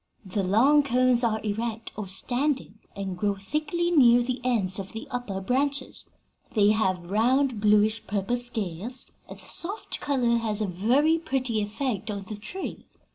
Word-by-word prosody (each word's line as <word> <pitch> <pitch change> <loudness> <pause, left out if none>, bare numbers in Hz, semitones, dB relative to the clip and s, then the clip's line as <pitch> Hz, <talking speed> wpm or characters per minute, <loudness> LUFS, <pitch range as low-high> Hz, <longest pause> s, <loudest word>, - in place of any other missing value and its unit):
The 195 +2 -2
long 245 +11 +5
cones 255 -2 +2
are 220 -2 +1
erect, 225 +2 -3
or 210 -2 -5
standing, 245 +3 0 0.2
and 195 -2 -4
grow 200 +2 0
thickly 305 - -2
near 245 -6 +6
the 245 0 -3
ends 210 -7 0
of 195 0 -7
the 225 - -7
upper 245 -6 -3
branches. 265 +6 -2 0.5
They 205 -1 +5
have 185 -4 0
round, 250 +3 +2
bluish 210 +1 +3
purple 205 +4 -1
scales, 235 -1 0 0.2
and - - -9
the - - -14
soft 395 +6 -3
color 245 -5 +1
has 220 -2 -1
a 215 - 0
very 250 - +2
pretty 255 -8 -1
effect 215 0 -3
on 200 -1 -4
the 215 +1 -7
tree. 370 - -7
230 Hz, 160 wpm, -26 LUFS, 205-260 Hz, 0.5 s, near